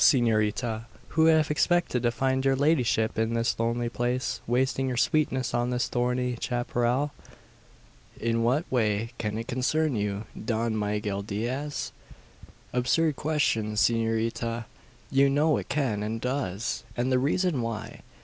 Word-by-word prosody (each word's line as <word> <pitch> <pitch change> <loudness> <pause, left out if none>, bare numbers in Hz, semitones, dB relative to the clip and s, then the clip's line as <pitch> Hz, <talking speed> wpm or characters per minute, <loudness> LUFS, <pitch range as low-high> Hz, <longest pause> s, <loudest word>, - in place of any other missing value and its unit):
S'norita_, 110 -3 +2 0.2
who'd 160 0 +4
have 155 -2 +3
expected 165 -4 +2
to 120 - +2
find 130 +2 0
your 135 0 +3
ladyship 130 -7 +2
in 110 +1 +1
this 115 0 0
lonely 115 +1 0
place 120 +2 -2
wasting 130 +2 +1
your 125 -2 -2
sweetness 130 +1 +1
on 120 0 +1
the 125 - -1
thorny 125 0 0
chapparal?" 120 +3 0 1.1
"In 115 0 0
what 130 +8 +2
way 110 -2 +1
can 105 -1 -2
it 115 - -4
concern 140 +3 +1
you, 105 0 -2 0.2
Don 115 0 0
Miguel 105 -1 -1
Diaz?" 120 +8 -3 0.8
"Absurd 140 +5 +2
question, 135 -8 0
S'norita! 115 +1 0 0.5
You 140 +1 +5
know 150 +2 +3
it - - -6
can, 135 -8 0
and 110 +2 -2
does; 120 -5 -2
and 125 +2 0
the 130 - +4
reason 155 +1 +1
why. 115 -2 -5
120 Hz, 140 wpm, -27 LUFS, 115-135 Hz, 1.1 s, You